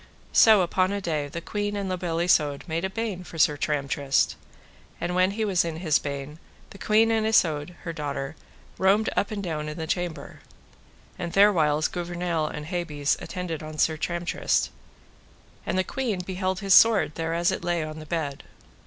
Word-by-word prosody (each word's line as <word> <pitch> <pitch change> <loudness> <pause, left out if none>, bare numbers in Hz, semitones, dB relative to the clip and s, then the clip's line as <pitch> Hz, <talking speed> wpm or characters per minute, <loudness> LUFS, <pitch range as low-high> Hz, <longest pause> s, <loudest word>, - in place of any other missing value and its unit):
So 220 -3 +7
upon 185 +2 +1
a 200 - -1
day 155 -6 -2
the 170 +4 -6
queen 205 +3 -3
and 200 -1 -3
La 185 - -1
Beale 170 -2 -2
Isoud 150 -5 +2
made 165 +1 -2
a 190 - 0
bain 205 -3 -4
for 170 - -10
Sir 150 -1 +4
Tramtrist. 140 -2 0 0.6
And 175 +1 -2
when 185 +1 +3
he 215 +2 -2
was 190 -3 +2
in 165 -1 -4
his 160 -3 +2
bain 140 +2 -6 0.3
the 200 - -12
queen 220 +3 +3
and 220 -1 +2
Isoud, 165 -6 +2
her 165 -3 -4
daughter, 145 -2 -4 0.4
roamed 200 +3 +3
up 200 - +1
and 205 -2 -4
down 155 -4 -3
in 150 - -7
the 160 - -3
chamber; 170 -3 -4 0.8
and 170 - -3
therewhiles 160 -7 +4
Gouvernail 175 -2 -2
and 150 0 -6
Hebes 155 -4 -1
attended 180 -4 -5
upon 155 0 -8
Tramtrist, 170 +3 0 1.0
and - - 0
the 185 - +3
queen 225 -5 -2
beheld 185 0 -2
his 195 -1 +3
sword 220 -8 +6
thereas 165 +2 0
it - - -4
lay 175 -2 0
upon 155 0 -6
his 155 - -8
bed. 145 -4 -3
175 Hz, 180 wpm, -26 LUFS, 155-190 Hz, 1.0 s, So